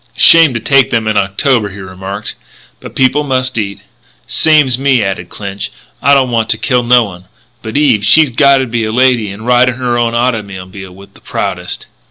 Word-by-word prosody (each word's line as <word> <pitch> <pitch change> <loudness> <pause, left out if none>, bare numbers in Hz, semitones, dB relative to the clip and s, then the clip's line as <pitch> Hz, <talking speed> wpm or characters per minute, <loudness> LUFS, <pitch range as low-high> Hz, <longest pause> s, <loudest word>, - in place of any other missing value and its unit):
"Shame 165 +2 +6
to - - -1
take 135 +3 +2
them 115 -2 -1
in 110 - 0
October," 105 +3 0
he 100 - -11
remarked, 95 +2 -7 0.5
"but - - -11
people 135 +3 +1
must 130 -2 -1
eat." 100 -2 -5 0.4
"Same's 150 -6 +2
me," 135 -2 +2
nodded 95 0 -4
Clinch; 100 -1 -7 0.3
"I 140 +1 +4
don't 130 -2 +1
want 115 -2 -1
to 110 - +2
kill 115 +3 0
no 120 0 +3
one, 90 -4 -10 0.4
but 110 +3 -5
Eve 130 -8 +2
she's 145 +7 +4
gotta 135 +1 +3
be 115 -1 -3
a 110 - -2
lady 125 -3 +2
and 100 +3 -9
ride 125 +1 +3
in 125 - -4
her 120 -1 -2
own 120 0 -1
automobile 100 -6 -4
with 100 +1 -16
the - - -20
proudest." - - -5
120 Hz, 195 wpm, -12 LUFS, 100-130 Hz, 0.5 s, Shame